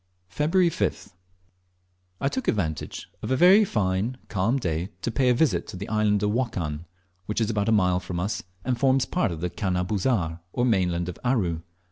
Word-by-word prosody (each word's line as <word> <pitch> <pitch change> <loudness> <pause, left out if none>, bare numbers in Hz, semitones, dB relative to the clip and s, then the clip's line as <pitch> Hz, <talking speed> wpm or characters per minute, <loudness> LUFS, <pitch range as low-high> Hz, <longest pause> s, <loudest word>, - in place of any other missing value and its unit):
Feb 150 +1 +1
5th. 180 - +1 1.1
I - - 0
took 260 - -3
advantage 80 -7 -2
of - - -4
a 130 - +2
very 185 +8 +7
fine 105 - 0
calm 105 +6 +1
day 85 - -2
to 120 - -1
pay 125 +3 +2
a - - +5
visit 150 +1 +1
to - - -7
the 100 - -6
island 105 -1 +2
of 105 - +2
Wokan, 90 -10 -2 0.4
which 105 - -1
is 115 0 +1
about 105 0 0
a - - +3
mile 90 -4 +3
from 90 -1 -5
us, 100 +5 -2 0.2
and 125 -2 0
forms 130 -1 +3
part 180 - 0
of 80 -1 -6
the 90 - -1
"canna 90 -2 -1
busar," 95 -5 0
or 120 - +1
mainland 90 -6 +1
of 90 - -6
Aru. 95 -11 0
105 Hz, 190 wpm, -25 LUFS, 90-125 Hz, 1.1 s, very